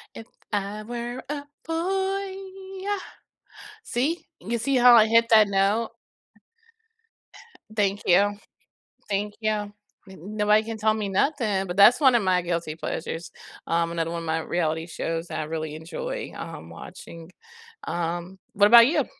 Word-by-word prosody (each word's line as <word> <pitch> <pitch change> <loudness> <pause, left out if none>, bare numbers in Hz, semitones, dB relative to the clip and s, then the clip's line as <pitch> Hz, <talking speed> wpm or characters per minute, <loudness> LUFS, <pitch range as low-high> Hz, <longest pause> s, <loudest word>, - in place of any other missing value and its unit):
If 225 - -9 0.2
I 205 0 -3
were 240 +2 -5
a 290 -1 -3 0.2
boy, 385 +4 -1 0.5
yuh! 405 0 -1 0.9
See, 290 +8 -1
you 235 +6 -3
see 275 +5 -1
how 245 -1 +8
I 220 -2 +7
hit 230 +1 +4
that 215 -2 +7
note? 200 +3 +1 1.8
Thank 205 -1 +1
you. 200 +3 +4 0.8
Thank 205 +1 -1
you, 215 -1 0
n 205 -1 -3 0.3
nobody 210 +4 +1
can 225 0 -6
tell 215 0 +2
me 215 -2 -3
nothing, 205 -3 0
but 175 +1 -5
that's 220 +7 +7
one 265 -3 +6
of 230 - +3
my 185 -1 +2
guilty 170 -3 -3
pleasures, 165 +1 -5 0.4
um, 170 0 +1
another 165 -1 -2
one 170 - -3
of 165 - -7
my 160 0 0
reality 160 0 -2
shows 165 0 -4
that - - -5
I - - -1
really 155 0 -4
enjoy, 475 - -6
um, - - -8
watching. 165 +1 -11 0.5
Um, 175 +2 -3 0.2
what 205 +1 +5
about 235 +1 +9
you? 295 - +1
205 Hz, 150 wpm, -25 LUFS, 175-235 Hz, 1.8 s, about